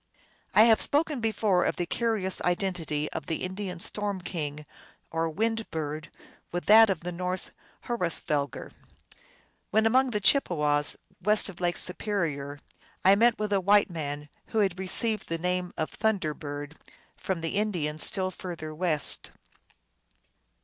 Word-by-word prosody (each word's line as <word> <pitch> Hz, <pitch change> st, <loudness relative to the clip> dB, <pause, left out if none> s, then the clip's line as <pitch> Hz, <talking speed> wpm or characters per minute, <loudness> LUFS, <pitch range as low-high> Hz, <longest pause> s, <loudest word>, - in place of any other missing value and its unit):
I 215 Hz, -, +8 dB
have 225 Hz, -1 st, +5 dB
spoken 300 Hz, -1 st, +1 dB
before 215 Hz, -4 st, +1 dB
of -, -, 0 dB
the 175 Hz, -, -2 dB
curious 215 Hz, -1 st, -1 dB
identity 175 Hz, -5 st, -1 dB
of -, -, -6 dB
the 160 Hz, -, -3 dB
Indian 185 Hz, -1 st, -5 dB
storm 205 Hz, +2 st, +1 dB
king, 150 Hz, -5 st, -5 dB, 0.5 s
or 165 Hz, 0 st, -1 dB
Wind 225 Hz, +6 st, -2 dB
Bird, 155 Hz, 0 st, -5 dB, 0.4 s
with 175 Hz, 0 st, -3 dB
that 220 Hz, +1 st, +8 dB
of 185 Hz, -5 st, -1 dB
the 180 Hz, +1 st, -5 dB
Norse 180 Hz, +1 st, -3 dB, 0.3 s
Hrosvelgar. 165 Hz, -, -1 dB, 1.0 s
When 220 Hz, +1 st, +2 dB
among 260 Hz, +4 st, +3 dB
the 210 Hz, -4 st, -1 dB
Chippewas, 150 Hz, -, +2 dB, 0.2 s
west 210 Hz, +2 st, +5 dB
of 185 Hz, -, -11 dB
Lake 175 Hz, 0 st, 0 dB
Superior, 165 Hz, -8 st, -2 dB, 0.5 s
I 190 Hz, -, +8 dB
met 230 Hz, +3 st, +4 dB
with 210 Hz, -1 st, -2 dB
a 195 Hz, -, +2 dB
white 200 Hz, +1 st, +4 dB
man 150 Hz, -3 st, -5 dB, 0.2 s
who -, -, -5 dB
had 190 Hz, -4 st, +1 dB
received 215 Hz, +4 st, +1 dB
the 165 Hz, -, -1 dB
name 180 Hz, +1 st, -2 dB
of 155 Hz, -, -2 dB
Thunder 205 Hz, -8 st, 0 dB
Bird 145 Hz, 0 st, -8 dB, 0.4 s
from 185 Hz, -3 st, -3 dB
the 165 Hz, +4 st, -3 dB
Indians 165 Hz, -8 st, -1 dB
still 185 Hz, -2 st, +2 dB
further 170 Hz, -5 st, -7 dB
west. 155 Hz, -3 st, +2 dB
180 Hz, 145 wpm, -27 LUFS, 160-210 Hz, 1.0 s, I